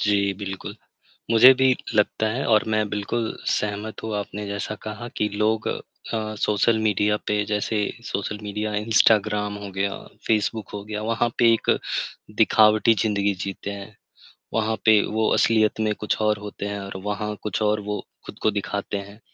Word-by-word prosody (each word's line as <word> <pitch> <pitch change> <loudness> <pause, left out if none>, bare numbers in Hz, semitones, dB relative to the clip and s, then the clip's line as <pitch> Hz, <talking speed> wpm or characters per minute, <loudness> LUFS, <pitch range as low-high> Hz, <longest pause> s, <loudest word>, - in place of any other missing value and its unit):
जी, 100 -1 +2
बिल्कुल। 95 -1 -6 0.6
मुझे 125 +4 +9
भी 130 0 +3 0.2
लगता 105 +1 +2
है 125 +5 -2
और 110 -2 +4
मैं 110 -1 +1
बिल्कुल 105 +3 -2
सहमत 105 +1 -2
हूँ 110 -1 -3
आपने 105 0 -5
जैसा 100 +1 -4
कहा 110 +2 -6
कि 105 - +2
लोग 110 +1 +1 0.5
अ, 110 -1 -2
सोशल 105 +2 +2
मीडिया 105 -1 +2
पे 105 0 +1
जैसे 105 +1 -1 0.3
सोशल 105 -2 -3
मीडिया, 105 +1 -3
इंस्टाग्राम 105 -1 +3
हो 100 -1 -7
गया, 100 +1 -1 0.4
फेसबुक 110 -1 0
हो 100 -1 -5
गया, 105 0 -4
वहाँ 115 +2 0
पे 115 -1 +6
एक 115 - -1 0.7
दिखावटी 110 +1 +5
ज़िंदगी 100 -2 +1
जीते 100 +1 -5
हैं। 100 +1 -9 0.6
वहाँ 110 0 +1
पे 110 -1 +7
वो 110 0 0
असलियत 110 -1 +3
में 110 -1 +1
कुछ 105 - -2
और 105 0 +2
होते 105 -1 -6
हैं 100 0 -3
और 100 -1 -6
वहाँ 105 +1 -3
कुछ 105 0 -2
और 105 0 +2
वो 105 - -1 0.3
खुद - - -10
को 110 - +3
दिखाते 100 0 -3
है। 100 +1 -9
105 Hz, 170 wpm, -24 LUFS, 100-110 Hz, 0.7 s, मुझे